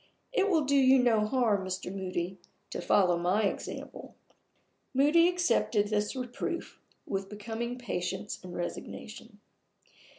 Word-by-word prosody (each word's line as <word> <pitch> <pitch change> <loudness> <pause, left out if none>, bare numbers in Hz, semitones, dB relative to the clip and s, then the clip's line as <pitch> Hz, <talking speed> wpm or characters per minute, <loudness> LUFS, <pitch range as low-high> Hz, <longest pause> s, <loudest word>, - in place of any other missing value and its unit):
It 405 -4 +3
will 325 -5 +3
do 280 +1 +2
you 265 -1 +6
no 225 -4 +3
harm, 220 -5 +2
Mr. 185 0 -4
Moody, 185 -1 -3 0.3
to - - -3
follow 180 -4 +3
my 185 +5 +2
example." 200 - -4 0.8
Moody 300 +5 +5
accepted 240 -12 +2
his 210 +1 0
reproof 255 +7 -4 0.3
with 195 0 -3
becoming 225 +3 -4
patience 195 -3 -3
and 180 -1 -8
resignation. 175 - -6
215 Hz, 125 wpm, -30 LUFS, 190-260 Hz, 0.8 s, you